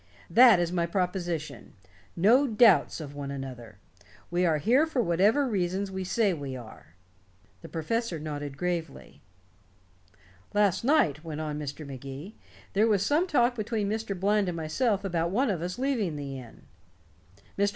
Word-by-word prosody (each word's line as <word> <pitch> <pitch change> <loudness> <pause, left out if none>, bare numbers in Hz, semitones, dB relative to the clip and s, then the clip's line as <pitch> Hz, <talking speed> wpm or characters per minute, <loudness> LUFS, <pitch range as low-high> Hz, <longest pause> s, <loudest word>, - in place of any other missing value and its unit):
That 235 -1 +7
is 175 -1 0
my 170 -2 0
proposition. 175 - -3 0.4
No 235 +11 +4
doubts 215 - +4
of 145 -3 -7
one 140 -1 -6
another. 125 -6 -7 0.5
We 175 +1 +2
are 160 -2 +2
here 250 - +3
for 300 -5 -2
whatever 210 +8 +3
reasons 190 -2 -1
we 190 0 -4
say 200 +1 +1
we 140 -5 -5
are." 110 -9 -12 0.7
The 165 - -10
professor 180 +4 -2
nodded 145 -2 -6
gravely. 175 0 -4 1.3
"Last 205 -2 +2
night," 200 - +2
went 155 -2 -6
on 150 -1 -4
Mr. 150 +1 -6
Magee, 140 - -8 0.4
"there 210 +3 +3
was 200 -3 +2
some 310 - +2
talk 250 -6 +3
between 215 -2 -2
Mr. 215 -4 -3
Bland 205 +1 +2
and 170 - -4
myself 200 +7 0
about 170 -3 0
one 230 +5 +1
of 175 -5 -3
us 180 +4 -4
leaving 245 - -1
the 140 -2 -6
inn. 120 -3 -14 0.9
Mr. 200 +1 +2
180 Hz, 155 wpm, -28 LUFS, 150-220 Hz, 1.3 s, That